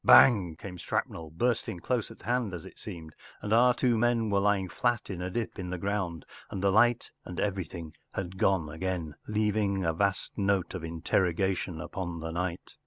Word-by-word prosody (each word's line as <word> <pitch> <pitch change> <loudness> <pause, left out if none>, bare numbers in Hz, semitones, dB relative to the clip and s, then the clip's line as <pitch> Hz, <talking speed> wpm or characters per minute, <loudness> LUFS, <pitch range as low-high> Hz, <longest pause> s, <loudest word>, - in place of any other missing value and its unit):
Bang 95 -11 +7
came 90 +2 -8
shrapnel, 80 -1 -2
bursting 115 +3 0
dose 115 +6 -1
at - - -13
hand 120 -5 0
as 85 - -8
it - - -12
seemed, 80 -3 -8 0.3
and 105 - -1
our 125 +2 +7
two 120 -2 +2
men 115 -2 +2
were 100 - +4
lying 100 -1 +2
flat 120 +2 0
in 90 -2 -4
a 90 - -2
dip 115 +2 -3
in 90 -1 -4
the 90 - -2
ground, 95 -3 -2 0.2
and 95 - -4
the 100 - +4
light 120 +3 +4
and 90 - -6
everything 90 -5 -3 0.2
had 95 0 -5
gone 95 -5 +3
again, 80 0 -3
leaving 105 -3 +1
a 80 - +2
vast 100 +3 0
note 100 -3 +1
of 90 -3 -5
interrogation 85 +1 0
upon 85 0 -4
the 80 0 -4
night. 85 +1 -3
95 Hz, 185 wpm, -29 LUFS, 85-105 Hz, 0.3 s, Bang